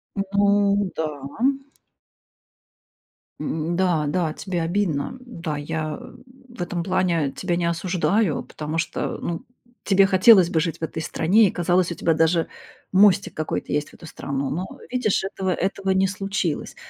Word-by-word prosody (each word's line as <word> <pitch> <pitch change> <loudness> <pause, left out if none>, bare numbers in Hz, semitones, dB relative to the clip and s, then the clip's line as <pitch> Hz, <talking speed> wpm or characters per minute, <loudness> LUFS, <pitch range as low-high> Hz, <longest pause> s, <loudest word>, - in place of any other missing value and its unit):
Ну 200 0 +2
да. 160 - -1 2.3
М, 165 +2 -2
да, 175 -4 +1
да, 160 -1 0
тебе 180 -4 -3
обидно. 170 - -1
Да, 170 -12 -5
я, 155 0 -3
м, - - -13 0.2
в 240 -6 -10
этом 175 -1 -2
плане 175 -6 +1
тебя 180 -2 -1
не 175 - 0
осуждаю, 180 +1 0
потому 155 +1 -5
что, 165 - -2
ну, 170 -1 -3 0.4
тебе 195 0 +4
хотелось 190 -1 +6
бы 160 - +1
жить 165 0 -2
в - - -8
этой 160 0 -3
стране 200 +9 +3
и - - -1
казалось, 175 0 +1
у 170 - -3
тебя 165 - +1
даже 165 +1 +2 0.4
мостик 195 0 +4
какой-то 155 - -3
есть 150 0 -1
в - - -21
эту 165 - -12
страну. 140 -2 -3
Но 180 +5 -2 0.3
видишь, 250 -7 +1
этого 190 -1 -2
этого 195 +2 -2
не 190 0 +3
случилось. 195 -4 -3
175 Hz, 155 wpm, -23 LUFS, 160-195 Hz, 2.3 s, хотелось